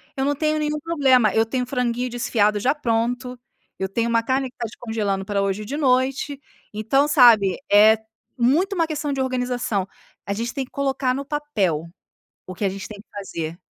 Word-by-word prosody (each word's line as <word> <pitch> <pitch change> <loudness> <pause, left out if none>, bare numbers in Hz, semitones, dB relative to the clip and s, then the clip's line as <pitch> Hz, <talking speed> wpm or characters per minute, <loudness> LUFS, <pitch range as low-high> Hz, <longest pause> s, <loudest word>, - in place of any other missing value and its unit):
eu 270 - -1
não 290 +1 +1
tenho 310 +1 0
nenhum 300 0 -1
problema; 270 - +3
eu 225 0 +3
tenho 250 +3 -2
o - - -7
franguinho 250 -1 -1
desfiado 215 -3 +1
já 255 +7 +2
pronto, 245 -1 -1 0.4
eu 190 - -1
tenho 230 +4 -1
uma 230 0 +2
carne 260 +2 0
que - - -29
está 235 - -4
descongelando 215 -4 -3
para 200 0 -1
hoje 195 +1 -1
e - - -9
de 275 +7 -4
noite; 270 0 +1 0.3
então, 230 +7 +2
sabe, 235 - +5
é 215 +2 +7 0.4
muito 305 - +2
uma 330 -4 +1
questão 295 -2 -3
de 270 - -1
organização 250 -6 -1 0.4
a 200 - -1
gente 230 +4 -3
tem 270 -2 -3
que - - -27
colocar 270 -2 0
no 275 +2 -3
papel 270 - -1 0.6
o 185 - -7
que 190 +3 -3
a - - +2
gente 195 +1 -7
tem 210 -2 -10
que - - -16
fazer. 165 -5 -5
245 Hz, 200 wpm, -22 LUFS, 210-275 Hz, 0.6 s, é